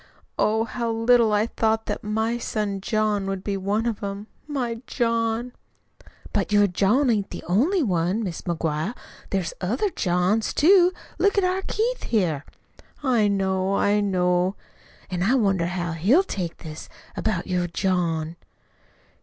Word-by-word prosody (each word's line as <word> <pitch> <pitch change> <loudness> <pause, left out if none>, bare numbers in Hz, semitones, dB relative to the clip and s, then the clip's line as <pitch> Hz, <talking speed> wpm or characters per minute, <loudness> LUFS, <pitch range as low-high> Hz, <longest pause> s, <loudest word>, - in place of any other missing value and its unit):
Oh, 220 +1 +2
how 235 +1 -3
little 230 0 +4
I 210 +1 +3
thought 220 -1 0
that - - -4
my 220 +3 -1
son 205 -4 -2
John 210 -1 0
would 195 -1 -3
be 200 - -2
one 200 +4 -1
of 225 -3 -2
'em 200 +1 -4 0.2
my 245 -6 -3
John!" 230 0 0 0.8
"But - - 0
your 205 0 +5
John 210 +8 +2
ain't 205 -3 0
the - - -7
only 290 - +2
one, 185 +1 0
Mis' 180 -5 -4
McGuire. 165 +4 -2 0.3
There's 190 -4 -1
other 245 - 0
Johns, 180 - 0
too. 360 +2 +6 0.3
Look 405 +1 +2
at 400 - +4
our 370 +1 +1
Keith 480 +3 -1
here." 170 -10 0 0.6
"I 240 -6 +3
know, 190 -1 0
I 205 +1 +2
know." 180 -1 +1 0.6
"An' 180 -1 -2
I 225 +8 +3
wonder 195 -8 +2
how 175 -1 -3
he'll 200 - +3
take 180 - -4
this 155 -1 -8 0.3
about 210 -6 -1
your 180 -2 -1
John?" 170 -3 -1
205 Hz, 150 wpm, -24 LUFS, 180-230 Hz, 0.8 s, too